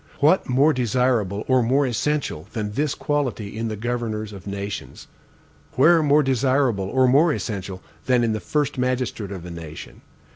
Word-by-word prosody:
What 155 +4 +3
more 140 +5 +4
desirable 120 -5 0
or 130 -1 +4
more 135 +5 +2
essential 125 - -2
than 105 -2 -3
this 145 +6 -1
quality 130 -9 -2
in 115 +1 -2
the 110 - -3
governors 110 -2 -3
of 100 0 -11
nations? 100 0 -6 0.7
Where 165 +6 +5
more 150 0 +4
desirable 130 -5 +1
or 130 +6 +2
more 145 +6 +4
essential 100 -8 -5 0.2
than 125 -2 +3
in 115 -2 +1
the 110 - -2
first 145 +2 -1
magistrate 125 -5 -1
of 90 -3 -7
a 90 - -7
nation? 80 -7 -9
120 Hz, 160 wpm, -23 LUFS, 105-135 Hz, 0.7 s, Where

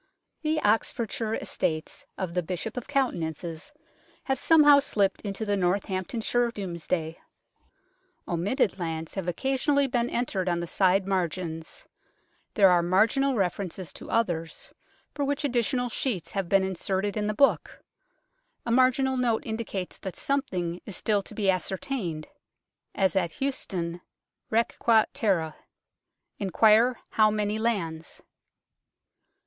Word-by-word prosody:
The 310 0 0
Oxfordshire 225 +1 0
estates 155 -1 -3
of 185 -3 -3
the 180 - +1
Bishop 180 +5 -4
of 250 - -5
Coutances 170 - -2 0.5
have 265 -2 -1
somehow 295 -3 +7
slipped 200 -8 0
into 205 +1 -4
the 205 -1 +1
Northamptonshire 195 +5 0
Domesday. 170 -5 -3 1.1
Omitted 195 - 0
lands 160 -2 -4
have 190 -3 -4
occasionally 270 - +1
been 245 -2 0
entered 195 -6 -1
on 175 -1 0
the 170 - -3
side 190 +2 +2
margins; 170 -3 -3 0.7
there 195 -2 +7
are 175 -1 +4
marginal 220 +10 +2
references 185 -3 -2
to - - -10
others, 170 -8 -1 0.4
for 285 - -2
which 285 +2 -1
additional 250 -1 +1
sheets 230 - -2
have 195 -4 -2
been 195 -1 +4
inserted 190 +2 -2
in 210 -1 -1
the 210 - -1
book; 275 +3 +2 0.9
a 235 - -1
marginal 260 +1 +3
note 235 -3 +1
indicates 220 -5 -4
that 190 - -6
something 180 -12 -2
is 200 - -4
still 210 -2 +1
to 215 - -12
be 205 -2 -1
ascertained, 185 - -3 0.7
as 190 -2 +2
at 175 -4 +1
Huste 275 -1 -2
done, 175 -2 -4 0.5
rq 230 +1 +1
qt 225 -2 +5
terra 165 -7 0 0.4
" - - -50
inquire 220 +5 +4
how 215 -1 +5
many 210 0 -1
lands 170 -9 -2
200 Hz, 130 wpm, -27 LUFS, 180-240 Hz, 1.1 s, somehow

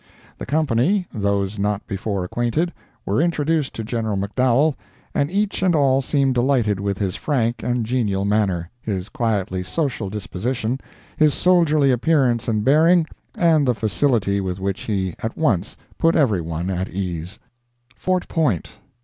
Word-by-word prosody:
The - - -6
company—those 115 - 0
not 105 0 -1
before 100 -2 -3
acquainted—were 120 - -2
introduced 160 -3 0
to 115 - -4
General 110 -2 -2
McDowell, 125 +9 +2 0.4
and 140 - +1
each 200 +1 -1
and 185 -3 +3
all 135 -2 +3
seemed 135 -1 +1
delighted 120 -5 +1
with 100 -1 -2
his 95 -3 -2
frank 120 -5 -1
and 125 -2 -1
genial 105 -5 0
manner, 95 -5 0
his 100 -2 -4
quietly 105 -8 -1
social 115 - -2
disposition, 110 +5 -3 0.4
his 155 -2 +4
soldierly 155 -6 +3
appearance 125 -2 +2
and 110 -2 0
bearing, 160 +4 +5 0.3
and 160 -5 +3
the 125 - +2
facility 110 -2 +1
with 95 -1 -3
which 95 0 -2
he 95 -4 -1
at 115 - -4
once 115 - 0 0.2
put 165 0 +3
every 115 - +3
one 85 +3 -3
at 95 +1 -2
ease. 90 0 -4 0.6
FORT 185 +4 -1
POINT. 140 - 0
115 Hz, 140 wpm, -21 LUFS, 100-145 Hz, 0.6 s, bearing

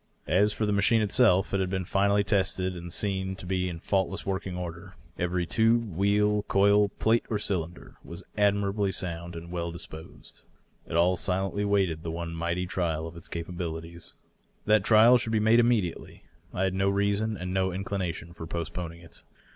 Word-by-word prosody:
As 100 +6 +3
for 110 - -1
the 105 - 0
machine 100 +3 +3
itself, 100 -3 +3
it 100 - +2
had 95 -1 0
been 95 -1 -2
finally 100 +2 +2
tested 95 -2 0
and 85 0 -8
seen 95 0 -1
to 95 - -10
be 90 0 -1
in 85 - -5
faultless 95 +3 -1
working 95 -1 -3
order. 85 -1 -7 0.2
Every 90 0 0
tube, 115 -2 +1
wheel, 105 +2 +2
coil, 100 +1 +4
plate 115 +3 +1
or 110 - 0
cylinder 90 -4 -4
was 85 +3 -9
admirably 100 -1 +1
sound 85 -1 -4
and 85 +1 -8
well 85 -1 -3
disposed. 80 -2 -10 0.5
It - - -5
all 90 +2 +3
silently 95 +2 -1
waited 95 -6 +1
the 85 - -5
one 85 0 -4
mighty 85 +2 -2
trial 85 -4 -2
of 80 +1 -8
its 85 - -10
capabilities. 85 -1 -6 0.5
That 105 -2 +4
trial 115 +4 +6
should 115 -1 -3
be 110 - +3
made 110 +2 +4
immediately. 115 -8 0 0.3
I 95 - -2
had 95 -1 +1
no 95 +1 +1
reason 100 +2 0
and 90 0 -4
no 95 0 +1
inclination 90 -3 -4
for 80 -1 -8
postponing 85 0 -5
it. 85 - -14
95 Hz, 180 wpm, -27 LUFS, 85-100 Hz, 0.5 s, trial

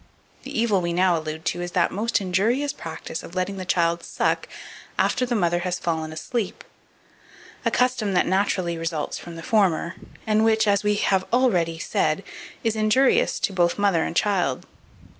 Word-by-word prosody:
The - - -4
evil 215 -5 +2
we 170 0 -1
now 180 0 +3
allude 160 0 -5
to 175 - -1
is 175 0 -5
that 180 - +2
most 220 +4 0
injurious 225 +10 +1
practice 160 0 -6
of 175 - -11
letting 185 +2 -2
the 185 - -5
child 170 -1 +1
suck - - -1 0.5
after 250 0 +1
the 240 - 0
mother 175 -4 +1
has 180 0 -2
fallen 160 -3 -2
asleep, 200 +6 -4 1.0
a - - +4
custom 250 -5 +1
that 180 - +3
naturally 185 -3 0
results 165 -2 -3
from 170 -1 -9
the 165 - -8
former, 185 -6 +2 0.3
and 215 0 +2
which, 220 -1 +3
as 200 0 +3
we 210 0 +2
hare 195 -2 +2
already 180 -10 +2
said, 155 +2 0 0.4
is 225 -2 +1
injurious 215 +5 +3
to 195 - 0
both 175 -2 +2
mother 200 -5 +2
and - - -4
child. 180 -10 +1
185 Hz, 175 wpm, -24 LUFS, 170-215 Hz, 1.0 s, a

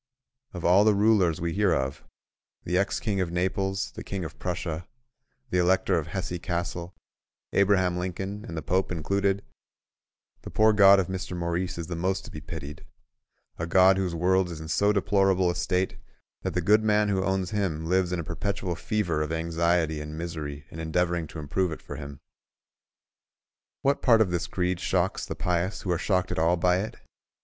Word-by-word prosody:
Of 90 -2 -5
all 90 +4 +6
the 105 -1 +4
rulers 100 -6 +3
we 85 0 -2
hear 100 -2 +3
of—the 65 +5 -6
ex 100 +2 +1
king 100 -4 -1
of 90 - -1
Naples, 95 +2 -1
the - - -8
king 95 -3 -4
of 80 0 -9
Prussia, 85 -2 -3 0.6
the 90 - +2
Elector 90 0 +3
of 80 - -6
Hesse 90 0 -4
Cassel, 85 0 -4 0.6
Abraham 95 -3 +3
Lincoln, 95 +3 -4
and 85 - -6
the 80 - -4
Pope 95 +2 0
included—the 100 +4 -5
poor 110 0 +4
God 100 -1 +7
of 95 - +1
Mr. 95 -1 -5
Maurice 85 +1 -2
is 85 - -4
the 85 +1 -5
most 95 +3 -1
to - - -10
be 75 - -8
pitied: 75 -4 -8 0.8
a 80 - -2
God 95 +2 +5
whose 90 -3 -1
world 90 +2 +2
is 85 -3 -6
in 80 0 -8
so 100 +6 +3
deplorable 95 -2 +2
a - - -5
state 90 +1 -1 0.4
that - - -3
the 90 - +2
good 105 +5 +4
man 105 -1 +3
who 95 -2 +1
owns 95 -1 -1
Him 90 -7 -1
lives 90 +1 +1
in 90 - -1
a - - -3
perpetual 95 +3 -3
fever 85 -2 -1
of 75 0 -2
anxiety 80 -1 0
and 75 +1 -7
misery 75 -4 -5
in 80 - -8
endeavoring 85 +1 0
to - - -10
improve 80 +4 -1
it 80 - -5
for - - -9
Him. 70 -1 -8 1.6
What 140 +1 +2
part 115 -3 +5
of 95 -5 +2
this 85 0 -1
creed 90 0 -1
shocks - - 0
the - - -4
pious 90 +2 -1
who 95 - -1
are 85 - +1
shocked 95 -3 0
at - - -1
all 85 +2 +3
by 90 +1 +3
it? 110 +4 -5
90 Hz, 185 wpm, -27 LUFS, 85-95 Hz, 1.6 s, God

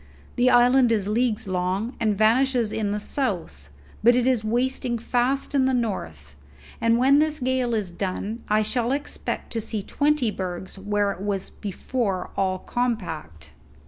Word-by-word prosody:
The 245 +1 +4
island 245 0 +5
is 205 -4 +1
leagues 225 0 0
long, 185 +6 -1
and 215 -3 +1
vanishes 235 +1 +3
in 210 -2 -1
the 210 - -1
south; 175 - -2 0.3
but 240 +2 +6
it 245 -1 +2
is 255 -4 +2
wasting 245 +2 0
fast 245 +5 0
in 270 -2 +3
the 260 0 +2
north, 80 - -4 0.5
and 230 0 +3
when 270 +3 +5
this 305 0 +1
gale 255 -2 0
is 200 -5 -2
done 200 +5 -4
I 215 +1 +3
shall 240 +3 0
expect 290 +1 -3
to 225 - -1
see 210 -1 -4
twenty 290 -4 +1
bergs 185 0 -5
where 205 0 0
it 185 - -8
was 200 -2 -2
before 205 -1 -3
all 190 -1 0
compact." 165 - -4
225 Hz, 160 wpm, -24 LUFS, 195-250 Hz, 0.5 s, but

